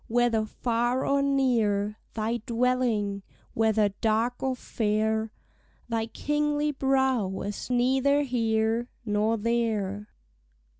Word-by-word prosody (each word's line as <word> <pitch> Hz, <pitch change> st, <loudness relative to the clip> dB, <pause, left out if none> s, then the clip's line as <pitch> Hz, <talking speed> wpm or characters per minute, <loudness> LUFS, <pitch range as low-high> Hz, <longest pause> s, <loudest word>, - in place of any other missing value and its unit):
Whether 230 Hz, -2 st, +2 dB
far 240 Hz, +3 st, 0 dB
or 280 Hz, 0 st, +2 dB
near 225 Hz, -7 st, +1 dB, 0.2 s
Thy 225 Hz, +1 st, -1 dB
dwelling, 235 Hz, -5 st, 0 dB, 0.3 s
whether 220 Hz, -2 st, +2 dB
dark 225 Hz, +4 st, 0 dB
or 265 Hz, -1 st, 0 dB
fair 220 Hz, -1 st, -1 dB, 0.6 s
Thy 225 Hz, -1 st, -1 dB
kingly 295 Hz, +4 st, 0 dB
brow, 265 Hz, -6 st, +1 dB
is 205 Hz, +4 st, -5 dB
neither 265 Hz, +3 st, +2 dB
here 230 Hz, -2 st, 0 dB, 0.2 s
Nor 215 Hz, +1 st, +1 dB
there. 210 Hz, -3 st, -1 dB
230 Hz, 100 wpm, -27 LUFS, 215-255 Hz, 0.6 s, Whether